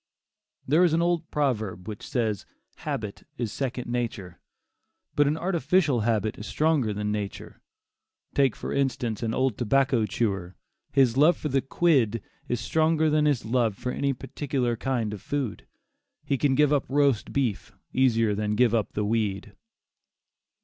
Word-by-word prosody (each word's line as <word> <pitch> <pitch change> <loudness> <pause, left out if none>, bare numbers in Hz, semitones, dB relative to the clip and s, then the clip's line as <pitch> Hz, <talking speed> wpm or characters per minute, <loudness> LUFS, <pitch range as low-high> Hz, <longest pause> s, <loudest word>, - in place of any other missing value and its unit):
There 155 +7 +4
is 170 -3 +3
an 165 - +3
old 170 -2 0
proverb 110 -11 -1
which 105 -2 -6
says 110 -6 -1
that - - -35 0.4
"habit 105 -2 -4
is 115 -4 -3
second 130 -2 -3
nature," 115 -7 -4 0.8
but 145 -1 +4
an 150 +2 +1
artificial 170 -5 +1
habit 110 -1 0
is 105 - -7
stronger 150 -8 +1
than 105 0 -2
nature. 105 -2 -5 0.7
Take 135 -4 +3
for - - -5
instance 125 -5 -1
an 115 -1 -1
old 130 -4 0
tobacco 130 -1 +2
chewer; 95 -4 -2 0.4
his 130 -3 +3
love 155 +5 +5
for 150 - -3
the 135 0 +2
"quid" 130 -7 +2 0.2
is 120 - -1
stronger 155 +4 +2
than 150 0 +3
his 145 -6 +1
love 115 -2 +1
for 125 - -3
any 140 +1 0
particular 135 -2 -2
kind 115 -3 -2
of 100 - -7
food. 140 -7 -3 0.6
He 140 - +1
can 135 0 +2
give 150 +1 +4
up 145 - +1
roast 140 -5 +2
beef 130 -7 -1 0.2
easier 115 -5 +3
than 105 +1 -1
give 120 0 +3
up 110 -3 0
the 105 - -1
weed. 105 -3 -1
125 Hz, 160 wpm, -26 LUFS, 110-145 Hz, 0.8 s, love